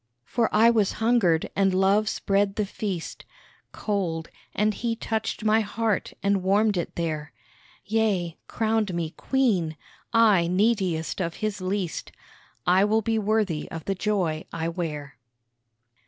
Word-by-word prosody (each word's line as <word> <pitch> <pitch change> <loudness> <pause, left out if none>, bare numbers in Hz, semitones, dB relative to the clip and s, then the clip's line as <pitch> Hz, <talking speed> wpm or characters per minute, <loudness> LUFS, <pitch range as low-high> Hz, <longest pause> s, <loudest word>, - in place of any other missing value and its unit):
For 230 - 0
I 225 +2 +6
was 215 -4 +2
hungered 220 -8 +2
and 195 -1 +2
Love 200 +3 +3
spread 195 0 0
the 210 - 0
feast, 195 -4 -5 0.5
Cold 175 -6 -2 0.2
and 210 +1 +2
He 230 +1 -2
touched 220 -1 -3
my 215 +1 +4
heart 220 0 -1
and 200 -1 +2
warmed 205 +3 +3
it 175 - -3
there, 155 -3 -3 0.5
Yea, 205 -6 0
crowned 220 -4 0
me 165 -2 -2
Queen 195 - 0 0.3
I 215 -7 +5
neediest 185 -3 +1
of 170 -2 -2
His 215 -2 -3
least, 185 -2 -3 0.5
I 185 +3 +5
will 215 +2 +2
be 225 +1 +1
worthy 210 -7 0
of 160 -2 -7
the 195 - 0
joy 185 -6 -1
I 165 0 -2
wear. 155 -5 -5
200 Hz, 140 wpm, -25 LUFS, 170-220 Hz, 0.5 s, I